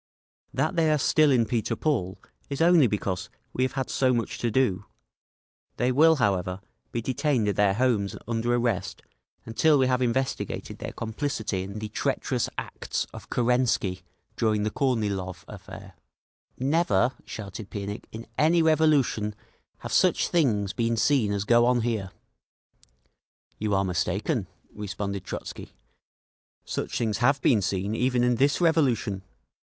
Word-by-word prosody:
That 195 - 0
they 160 -2 +3
are 150 - +3
still 155 +2 +4
in 125 -4 +4
Peter 115 0 -1
Paul 110 - -1 0.3
is 140 - -4
only 165 -4 +6
because 95 -3 -2 0.2
we - - -2
have 130 - -1
had 135 -2 -2
so 130 -2 +2
much 115 - -3
to 120 - 0
do…. 105 -5 +1 0.9
They 125 +1 +2
will, 160 +5 +5
however, 95 - 0 0.3
be 115 - -3
detained 130 -2 0
at 100 - 0
their 100 -1 +3
homes 115 -5 +1
under 115 +1 0
arrest 120 -5 -1 0.4
until 145 +7 +3
we 130 - +3
have 130 0 +1
investigated 130 +2 -2
their - - -5
complicity 110 -4 -3
in 100 +2 -6
the 110 0 -4
treacherous - - -1
acts - - -3
of - - -11
Kerensky 120 -6 +1 0.3
during 110 -2 +1
the 105 - -1
Kornilov 100 -9 -1
affair!" - - -10 0.6
"Never," 130 - +2
shouted 100 0 -8
Pianikh, 100 0 -5
"in 115 +1 -8
any 165 +2 +4
revolution 150 -9 +2 0.5
have - - -5
such - - +3
things 105 - +1
been 115 -1 0
seen 125 -3 +2
as 100 -1 -1
go 120 +2 +4
on 125 -1 +3
here!" 110 -5 -2 1.5
"You 105 -2 0
are 95 0 +2
mistaken," 95 - -1 0.3
responded 100 -1 -4
Trotzky. - - -7 0.9
"Such - - -3
things 110 -3 -1
have 140 +3 +3
been 110 -6 +4
seen 100 +2 -1
even 125 +1 +1
in 125 -1 +2
this 140 +4 +2
revolution. 130 - +2
115 Hz, 145 wpm, -26 LUFS, 100-130 Hz, 1.5 s, only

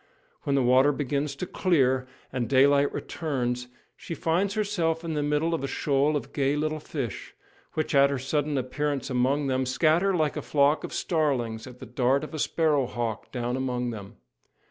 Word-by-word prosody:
When 140 - +1
the 135 - +3
water 130 +3 +5
begins 140 0 -2
to 180 - -4
clear, 130 -10 +1 0.3
and 120 -3 -2
daylight 140 +1 +4
returns, 125 -6 -3 0.3
she 165 - -7
finds 180 +6 0
herself 175 -6 0
in 165 -1 -3
the 150 - 0
middle 150 +3 +1
of 160 - -2
a - - -1
shoal 145 +2 +1
of 135 -1 -8
gay 140 0 +1
little 155 +1 -1
fish, 140 -6 -5 0.4
which, 155 0 -1
at 140 0 +6
her 140 - -1
sudden 145 +2 -1
appearance 140 +2 -2
among 130 +4 +1
them, 130 -1 0
scatter 165 +8 +2
like 155 -3 +1
a - - -3
flock 145 +1 +2
of - - -5
starlings 130 -9 -1
at 125 -1 -11
the - - -9
dart 125 +4 +1
of 155 - -7
a 155 - -4
sparrow 150 -4 +1
hawk 115 -3 -4
down 125 -1 -2
among 125 -2 -2
them. 100 -3 -9
140 Hz, 185 wpm, -27 LUFS, 130-155 Hz, 0.4 s, at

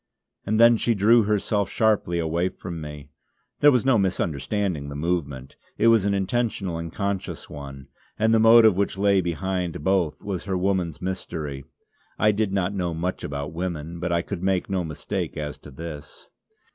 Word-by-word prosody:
And 110 +1 +1
then 115 0 +7
she 115 +1 +1
drew 110 +3 +5
herself 105 -1 0
sharply 105 -6 +1
away 85 +2 0
from 85 -3 -7
me. 75 -1 -9 0.5
There 145 - +7
was 125 -3 +2
no 130 -5 +4
misunderstanding 90 -2 -1
the 70 - -7
movement; 70 -5 -3 0.2
it 115 - +4
was 115 -4 +4
an 100 - +1
intentional 100 -3 -1
and 85 -1 -6
conscious 100 0 -4
one, 70 -2 -9 0.3
and 110 +1 +2
the 115 - +5
motive 115 -2 +7
which 100 0 -1
lay 100 -1 +3
behind 90 -1 -3
both 95 -4 +1
was 95 -3 -5
her 95 -2 -1
woman's 90 -4 -1
mystery. 75 -7 -4 0.5
I 110 - +4
did 105 -1 -1
not 95 0 0
know 90 -4 -2
much 90 +3 -3
about 70 +2 -4
women, 85 -1 -4
but 85 0 -2
I 85 0 +1
could 100 -4 -5
make 95 0 0
no 95 -2 0
mistake 75 -3 -4
as 75 -1 -4
to - - -12
this. 75 +1 -9
90 Hz, 175 wpm, -24 LUFS, 80-100 Hz, 0.5 s, then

